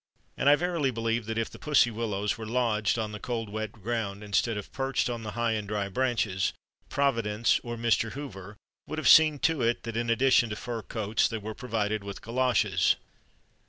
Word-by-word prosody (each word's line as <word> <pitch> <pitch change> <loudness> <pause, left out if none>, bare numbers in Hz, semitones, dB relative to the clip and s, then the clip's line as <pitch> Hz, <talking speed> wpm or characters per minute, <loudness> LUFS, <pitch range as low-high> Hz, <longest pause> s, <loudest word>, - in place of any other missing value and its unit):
And 140 - +3
I 145 - +8
verily 170 -4 0
believe 115 -1 -1
that 115 0 -3
if 115 - -1
the - - -12
Pussy 145 -5 +3
Willows 105 -3 -2
were 110 -1 -7
lodged 110 -3 +1
on 110 -2 -2
the 105 - -7
cold 115 -2 -3
wet 110 0 -4
ground 105 -2 -4
instead 105 +2 0
of 105 - -7
perched 135 -2 -1
on 120 -1 -4
the 110 -1 -6
high 120 -1 +1
and 105 -2 -2
dry 100 -1 -2
branches, 110 -5 0 0.4
Providence 115 -6 +1
(or 120 -1 -5
Mr. 115 -1 +1
Hoover) 105 -8 -8 0.3
would 155 - -5
have 155 - 0
seen 155 -2 +7
to 160 -4 +2
it 120 0 +1
that 115 -1 -5
in 115 0 -1
addition 120 0 +4
to 105 - -3
fur 115 +1 -5
coats 110 -1 0
they 115 - -4
were 110 +1 -6
provided 110 -4 -2
with 100 -1 -8
galoshes. 125 +1 +2
115 Hz, 195 wpm, -28 LUFS, 105-125 Hz, 0.4 s, I